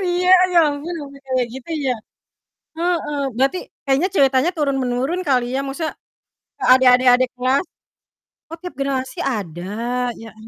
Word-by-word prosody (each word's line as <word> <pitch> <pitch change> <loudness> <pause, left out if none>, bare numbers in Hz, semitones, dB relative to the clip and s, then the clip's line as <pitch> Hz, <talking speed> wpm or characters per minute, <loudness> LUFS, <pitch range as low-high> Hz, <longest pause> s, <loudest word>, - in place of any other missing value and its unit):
iya, 360 +1 +1 0.2
ya 350 - +5
ampun, 290 +5 -5
sampai 280 -1 -10
kayak 255 -2 0
gitu 265 +5 -9 0.2
ya? 255 - +1 0.8
Heeh. 335 -4 -1 0.2
Berarti, 270 +8 +1 0.3
kayaknya 275 +6 +2
ceritanya 270 +2 +3
turun 280 -3 0
menurun 255 +8 -1
kali 250 -3 +2
ya, 270 - 0
maksudnya 310 +4 -3 0.7
ke - - -4
adik 260 0 +5
adik 255 0 +3
adik 255 +1 +1
kelas. 255 +5 +1 0.9
Oh, 330 - -7
tiap 360 -4 -7
generasi 265 -1 -2
ada, 175 -6 -5 0.6
ya 225 - -9
am 220 0 -13
270 Hz, 155 wpm, -20 LUFS, 255-310 Hz, 0.9 s, ya